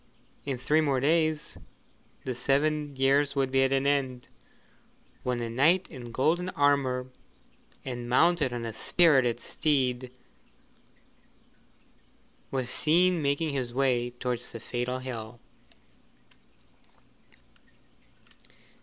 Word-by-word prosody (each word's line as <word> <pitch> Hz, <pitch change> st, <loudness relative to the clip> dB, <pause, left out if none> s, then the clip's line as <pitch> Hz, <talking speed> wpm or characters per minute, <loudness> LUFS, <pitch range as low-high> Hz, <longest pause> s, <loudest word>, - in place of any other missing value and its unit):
In 135 Hz, -3 st, -2 dB
three 150 Hz, +5 st, +2 dB
more 140 Hz, -4 st, +1 dB
days 155 Hz, +2 st, 0 dB, 0.7 s
the 130 Hz, -, -2 dB
seven 145 Hz, +3 st, 0 dB
years 140 Hz, +2 st, +2 dB
would 135 Hz, -1 st, 0 dB
be 135 Hz, 0 st, +3 dB
at 135 Hz, 0 st, +2 dB
an 135 Hz, 0 st, +1 dB
end, 130 Hz, -3 st, -1 dB, 0.9 s
when 125 Hz, -1 st, -2 dB
a 115 Hz, -, -2 dB
knight 155 Hz, +11 st, +3 dB
in 125 Hz, -5 st, -9 dB
golden 170 Hz, +9 st, +1 dB
armour 135 Hz, -5 st, +1 dB, 0.7 s
and 120 Hz, -2 st, -5 dB
mounted 165 Hz, +1 st, +3 dB
on 120 Hz, -1 st, -4 dB
a 115 Hz, -, -5 dB
spirited 130 Hz, -3 st, +3 dB
steed 130 Hz, -2 st, 0 dB, 2.4 s
was 130 Hz, -2 st, -2 dB
seen 175 Hz, +2 st, +2 dB
making 145 Hz, +2 st, 0 dB
his 125 Hz, -3 st, -3 dB
way 125 Hz, -3 st, +1 dB
towards 125 Hz, 0 st, -4 dB
the 115 Hz, -, -7 dB
fatal 125 Hz, +2 st, -3 dB
hill. 120 Hz, -3 st, -7 dB
135 Hz, 105 wpm, -28 LUFS, 125-150 Hz, 2.4 s, be